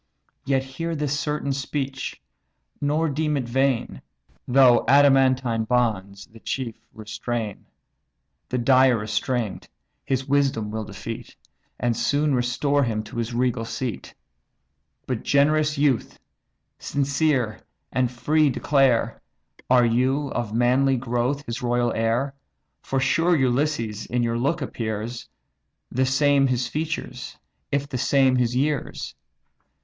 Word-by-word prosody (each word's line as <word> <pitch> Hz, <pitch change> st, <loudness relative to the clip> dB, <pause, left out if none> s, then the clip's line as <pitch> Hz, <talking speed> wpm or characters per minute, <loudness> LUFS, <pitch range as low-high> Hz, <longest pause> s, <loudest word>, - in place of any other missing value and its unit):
Yet 135 Hz, -1 st, +2 dB
hear 165 Hz, +6 st, -4 dB
this 145 Hz, -2 st, -1 dB
certain 150 Hz, -1 st, -2 dB
speech, 135 Hz, 0 st, -4 dB, 0.6 s
nor 150 Hz, +3 st, +1 dB
deem 150 Hz, 0 st, 0 dB
it 135 Hz, -, -1 dB
vain; 135 Hz, 0 st, 0 dB, 0.5 s
Though 125 Hz, -1 st, +5 dB
adamantine 130 Hz, -4 st, +4 dB
bonds 105 Hz, -5 st, -1 dB
the 115 Hz, -, -17 dB
chief 125 Hz, 0 st, -3 dB, 0.2 s
restrain, 110 Hz, 0 st, -5 dB, 0.8 s
The 125 Hz, -, -1 dB
dire 130 Hz, 0 st, +4 dB
restraint 110 Hz, +1 st, -2 dB, 0.3 s
his 135 Hz, 0 st, -2 dB
wisdom 135 Hz, -7 st, +1 dB
will 110 Hz, 0 st, -4 dB
defeat, 115 Hz, +4 st, -8 dB, 0.4 s
And 120 Hz, -1 st, 0 dB
soon 145 Hz, +5 st, +1 dB
restore 130 Hz, +3 st, +1 dB
him 110 Hz, -3 st, -1 dB
to -, -, -10 dB
his 115 Hz, 0 st, -2 dB
regal 125 Hz, -2 st, 0 dB
seat. 115 Hz, 0 st, -5 dB, 0.9 s
But 125 Hz, -4 st, -3 dB
generous 150 Hz, +1 st, +2 dB
youth! 140 Hz, -4 st, +1 dB, 0.6 s
sincere 140 Hz, -5 st, 0 dB, 0.3 s
and 130 Hz, -1 st, +1 dB
free 150 Hz, +5 st, +2 dB
declare, 135 Hz, -3 st, +2 dB, 0.5 s
Are 125 Hz, -1 st, +5 dB
you, 130 Hz, +5 st, +1 dB
of 120 Hz, -4 st, -3 dB
manly 130 Hz, +4 st, +3 dB
growth, 125 Hz, +3 st, -1 dB
his 115 Hz, -, -5 dB
royal 120 Hz, -1 st, +1 dB
heir? 115 Hz, +5 st, 0 dB, 0.5 s
For 135 Hz, -, -2 dB
sure 165 Hz, +6 st, +2 dB
Ulysses 125 Hz, -5 st, 0 dB
in 120 Hz, 0 st, 0 dB
your 115 Hz, 0 st, 0 dB
look 140 Hz, +5 st, 0 dB
appears, 115 Hz, -, -5 dB, 0.6 s
The 130 Hz, +1 st, +1 dB
same 140 Hz, +1 st, +3 dB
his 125 Hz, -1 st, 0 dB
features, 155 Hz, -5 st, -4 dB, 0.3 s
if 140 Hz, 0 st, 0 dB
the 130 Hz, -3 st, -4 dB
same 130 Hz, 0 st, +3 dB
his 120 Hz, -1 st, +1 dB
years. 145 Hz, +2 st, -2 dB
130 Hz, 125 wpm, -24 LUFS, 120-140 Hz, 0.9 s, Though